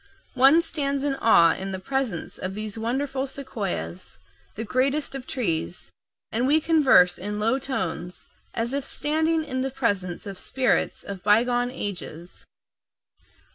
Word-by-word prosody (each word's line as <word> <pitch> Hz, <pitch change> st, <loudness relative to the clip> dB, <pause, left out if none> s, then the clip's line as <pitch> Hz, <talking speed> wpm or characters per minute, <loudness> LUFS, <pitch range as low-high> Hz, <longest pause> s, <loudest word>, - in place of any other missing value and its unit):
One 275 Hz, +6 st, +6 dB
stands 280 Hz, -4 st, -2 dB
in 285 Hz, -1 st, +1 dB
awe 170 Hz, -9 st, +6 dB
in 195 Hz, +1 st, -5 dB
the -, -, -2 dB
presence 260 Hz, -4 st, -3 dB
of 190 Hz, +1 st, -4 dB
these 215 Hz, -1 st, -4 dB
wonderful 265 Hz, +4 st, -2 dB
sequoias, 195 Hz, -, -5 dB, 0.4 s
the 225 Hz, -, -4 dB
greatest 270 Hz, +6 st, 0 dB
of 270 Hz, -2 st, -7 dB
trees, 175 Hz, -8 st, -2 dB, 0.4 s
and 240 Hz, +3 st, +1 dB
we 300 Hz, +3 st, +4 dB
converse 280 Hz, -, +5 dB
in 205 Hz, +2 st, -3 dB
low 230 Hz, +5 st, +2 dB
tones, 180 Hz, -9 st, -4 dB, 0.3 s
as 235 Hz, +2 st, -1 dB
if 280 Hz, 0 st, -1 dB
standing 315 Hz, +3 st, 0 dB
in 260 Hz, -4 st, -3 dB
the 265 Hz, -, -1 dB
presence 205 Hz, -9 st, -2 dB
of 195 Hz, -2 st, -7 dB
spirits 255 Hz, -4 st, 0 dB
of 195 Hz, -2 st, -7 dB
bygone 240 Hz, +4 st, +3 dB
ages. 180 Hz, -7 st, -6 dB
245 Hz, 140 wpm, -25 LUFS, 195-275 Hz, 0.4 s, One